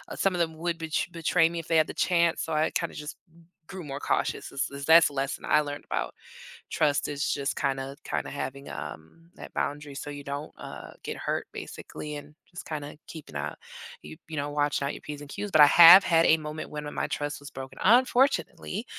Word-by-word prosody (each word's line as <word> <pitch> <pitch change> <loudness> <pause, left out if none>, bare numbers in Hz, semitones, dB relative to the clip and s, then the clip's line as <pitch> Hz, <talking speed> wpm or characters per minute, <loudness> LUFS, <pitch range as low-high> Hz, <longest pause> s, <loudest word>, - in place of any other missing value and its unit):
some 195 - +1
of 175 - -2
them 160 -1 0
would 170 +1 -2
bet 160 -2 -2
betray 165 0 +3
me 170 0 -4
if 160 - -8
they 165 - +3
had 155 - +4
the - - -6
chance. 170 -2 +2
So 160 - -4
I 155 +1 +1
kinda 170 - -2
just 150 +1 -6
g 165 +1 -21 0.2
grew 190 -2 -8
more 140 -2 -6
cautious - - -1
is, 140 - -1
is 140 0 -7
that's 165 +1 +8
the - - -13
lesson 135 +1 -3
I - - +4
learned 145 -1 -6
about - - -3 0.5
trust 145 -2 +1
is 145 -1 -1
just 140 -1 -2
kind 135 -2 0
of, 135 +1 -6
kinda - - -3
having, 140 0 -5
um, 80 - -9
that - - -11
boundary 145 0 -3
so 145 - -6
you 145 0 -7
don't, 140 +2 -6
uh, - - -9
get - - -5
hurt - - -2
basically 150 0 -7
and 145 +1 -10 0.2
just 175 - -9
kinda 150 -1 -6
keeping 150 - -10
a 75 +1 -4 0.5
you 75 +1 -11
you 160 - -6
know, 145 0 -2
watching 145 -1 0
out 140 - -1
your - - -9
Ps 150 -1 -7
and 145 - -11
Qs. 205 +6 -5
But 155 -4 +7
I - - +10
have 175 +5 +10
had 165 -1 +4
a 160 - +6
moment 155 0 -6
when 150 0 -6
m 145 - -6
my - - -1
trust 145 0 -4
was 145 - -10
broken, 130 0 -9
unfortunately, 240 - +2
150 Hz, 230 wpm, -27 LUFS, 140-165 Hz, 0.5 s, I